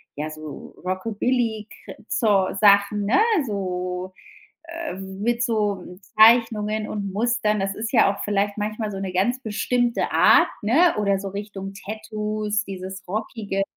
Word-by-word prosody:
ja, 155 +2 -4
so 155 -1 -9
Rockabilly-Kr 220 +3 -2
Zeu 200 -4 +2
Sachen, 200 0 +4
ne, 220 - +3 0.3
so, 185 -3 -3 0.8
ähm 190 -3 -6
mit 240 +1 +1
so, 210 -5 0
äh, 180 +1 -12 0.2
Zeichnungen 215 -1 +4
und 200 -2 -4
Mustern. 215 0 0
Das 195 0 -1
ist 220 +2 -4
ja 220 -5 +4
auch 200 - -11
vielleicht 205 0 -1
manchmal 215 +1 -3
so 195 - -5
'ne 195 -1 -4
ganz 240 +8 +1
bestimmte 240 +2 0
Art, - - +6
ne, 300 +12 +4
oder 200 -1 +2
so 195 0 -5
Richtung 195 -1 -7
Tattoos, 215 0 -3
dieses 190 0 -7
Rockige, 205 0 -3
210 Hz, 140 wpm, -23 LUFS, 195-220 Hz, 0.8 s, Art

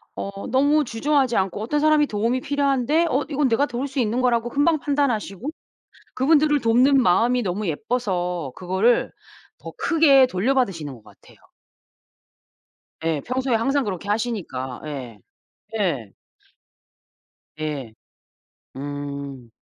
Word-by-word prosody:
어 200 0 -6
너무 285 +4 +3
주저하지 260 +1 +1
않고 190 +2 -1
어떤 295 +7 0
사람이 305 -1 +4
도움이 230 +4 -1
필요한데 285 +3 +1
어 270 +3 +1
이건 285 -2 +1
내가 245 +4 +2
도울 255 +1 -4
수 270 0 -4
있는 235 +1 0
거라고 240 -1 +1
금방 295 +4 +2
판단하시고 275 -5 -1 0.7
그분들을 295 +2 +3
돕는 255 +4 +4
마음이 240 +5 +3
너무 200 0 -2
예뻐서 180 - -2
그거를 190 +6 +1 0.5
더 - - -9
크게 285 -6 +5
돌려받으시는 195 - 0
것 115 -4 -15
같아요. - - -19 1.7
예. 160 -3 0
평소에 255 0 -1
항상 270 +5 +1
그렇게 200 -2 -5
하시니까. 195 - -3
예. 130 -7 -7 0.6
예. 140 - -1 1.5
예. 145 -7 -4 0.8
음. 140 -3 -6
230 Hz, 270 characters per minute, -23 LUFS, 175-275 Hz, 1.7 s, 크게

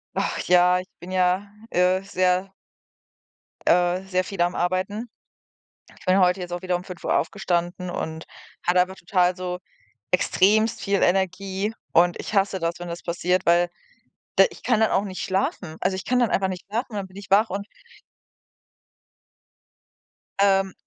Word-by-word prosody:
Ach - - -1
ja, 180 0 +5
ich 185 - -9
bin 175 - -10
ja, 185 +2 +1 0.2
äh, 180 +1 +2
sehr 185 0 0 1.1
äh, 180 +1 +3
sehr 185 -1 +1
viel 190 -1 -4
am 175 +1 +1
Arbeiten. 185 +6 -1 0.9
Ich - - -17
bin 185 +1 +4
heute 180 +1 +3
jetzt 175 -1 -6
auch 175 - -4
wieder 180 -1 0
um 175 - -4
05:00 180 -3 -2
aufgestanden 175 -1 -2
und 160 -2 -5 0.4
hatte 180 +1 +4
einfach 185 +1 -2
total 180 0 +1
so 180 -1 -4 0.5
extremst 215 +4 +3
viel 200 -1 0
Energie 190 +3 0 0.2
und 175 +1 +4
ich - - -6
hasse 195 -1 +2
das, 170 0 -1
wenn 175 - -6
das 170 0 -6
passiert, 180 +1 0
weil 175 +1 +4 0.7
d - - +8
ich - - -14
kann 240 -3 +2
dann 220 - +3
auch 195 - +2
nicht 185 -4 -5
schlafen. 185 -3 -2
Also, 190 +1 0
ich 190 - -6
kann 250 - +1
dann 240 - +2
einfach 190 -1 +1
nicht 185 -1 -6
schlafen 235 +5 -2
und 210 - -6
dann 200 -1 -3
bin 185 - -17
ich 200 -1 -10
wach 210 +3 +4
und 200 +2 -4 2.7
Ähm. 195 -1 +3
185 Hz, 165 wpm, -24 LUFS, 180-195 Hz, 2.7 s, d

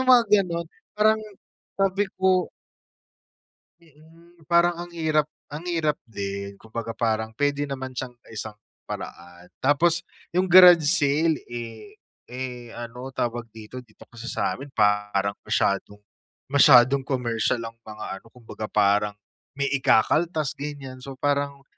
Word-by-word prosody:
yung 260 0 +3
mga 235 - +3 0.2
gano'n? 170 -2 -3 0.3
Parang 215 +1 +4 0.6
sabi 195 0 +1
ko 185 -1 +2 1.3
Mm, 165 +1 -21
parang 170 0 +3
ang - - -17
hirap 155 -2 +1 0.2
ang 155 +4 -7
hirap 160 -4 0
din. 100 -2 -5
Kumbaga 115 0 -6
parang 110 -1 -1
pwede 145 +3 0
naman 130 -1 -5
siyang 125 -1 -5 0.2
isang 110 -1 -6 0.3
paraan. 90 +1 -8 0.2
Tapos, 170 +5 +3 0.3
yung 185 +1 +3
garage 180 -2 +9
sale, 150 +1 +2
eh, 120 - -8 0.3
eh, 125 -1 -6
ano 120 +2 -7
tawag 120 -2 -3
dito, 110 +3 -9
dito 110 -4 -18
kasi 120 +1 -9
sa'min 140 +2 -2
parang 105 -1 +1
masyadong 100 +1 0 0.5
masyadong 135 -1 +6
commercial 120 -3 -1
ang 115 - -7
mga 110 -1 -9 0.2
ano, - - -24
kumbaga 115 -3 -8
parang 105 0 +2 0.4
may 140 - +1
ikakaltas 150 +4 +2
ganyan. 140 -3 -7
So, 135 -1 -8
parang 140 0 -1
135 Hz, 125 wpm, -25 LUFS, 115-160 Hz, 1.3 s, garage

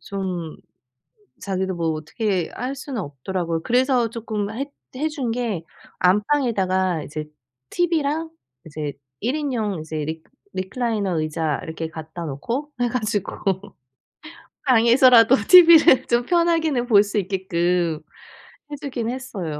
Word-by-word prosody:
좀 185 -5 -5 0.8
자기도 190 -1 -2
뭐 165 -1 0
어떻게 180 +4 -2
할 255 +3 -4
수는 265 -3 -5
없더라고요. 165 +3 -3
그래서 250 -1 +2
쪼끔 215 -3 -4
해 270 +5 -3 0.3
해 290 - -3
준 275 -7 -3
게 225 -8 -2 0.4
안방에다가 190 - +1
이제 155 +1 -6 0.4
TV랑 320 -2 0 0.4
이제 150 -2 -5 0.3
1 250 +7 -1
인용 225 - -2
이제 155 0 -5
리 160 0 -5 0.3
리클라이너 200 -3 -1
의자 155 -1 -1
이렇게 160 0 -5
갖다 160 +1 -8
놓고 230 - -4
해 245 - +2
가지고 215 -5 -2 1.3
방에서라도 245 0 +6
TV를 335 -6 +8
좀 240 0 +1
편하게는 325 -6 +1
볼 205 -3 +6
수 205 +1 -2
있게끔 175 -4 0 0.7
해 - - -3
주긴 250 -5 -3
했어요. 195 - -5
210 Hz, 255 characters per minute, -22 LUFS, 170-255 Hz, 1.3 s, TV를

